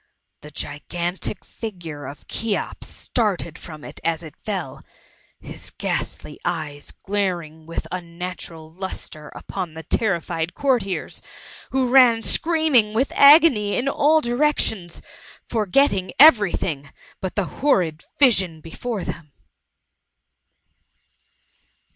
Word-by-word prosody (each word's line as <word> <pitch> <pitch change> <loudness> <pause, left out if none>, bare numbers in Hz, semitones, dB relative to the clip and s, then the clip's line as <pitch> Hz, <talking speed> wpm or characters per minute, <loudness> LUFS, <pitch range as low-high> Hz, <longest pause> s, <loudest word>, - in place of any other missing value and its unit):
The 150 - -11
gigantic 170 +6 -4
figure 165 - -7
of 140 - -11
Cheops 225 -2 -3
started 195 -9 -2
from 155 -3 -10
it - - -9
as 165 0 0
it 155 - -10
fell^ 190 -10 -4 0.6
his - - -9
ghastly 150 - -4
eyes 155 -4 -4
glaring 175 -6 -2
with 165 - -4
unnatural 170 -2 -6
lustre 165 -4 -7
upon 180 -5 -5
the 160 - -7
terrified 170 -3 -1
courtiers, 245 -9 -1 0.5
who 265 -1 +1
ran 245 -3 +6
scream 320 -2 +1
ing 215 -3 +4
with 260 +5 +1
agony 280 -8 +6
in 250 - -1
all 305 +3 +3
directions, 240 - 0 0.4
forgetting 210 -2 +1
every 240 - +8
thing 140 -5 -3 0.3
but 190 - -4
the 205 - +1 0.2
horrid 180 - +2 0.2
vision 190 - +4
before 200 +6 -5
them. 150 -3 -7
185 Hz, 110 wpm, -22 LUFS, 165-240 Hz, 0.6 s, every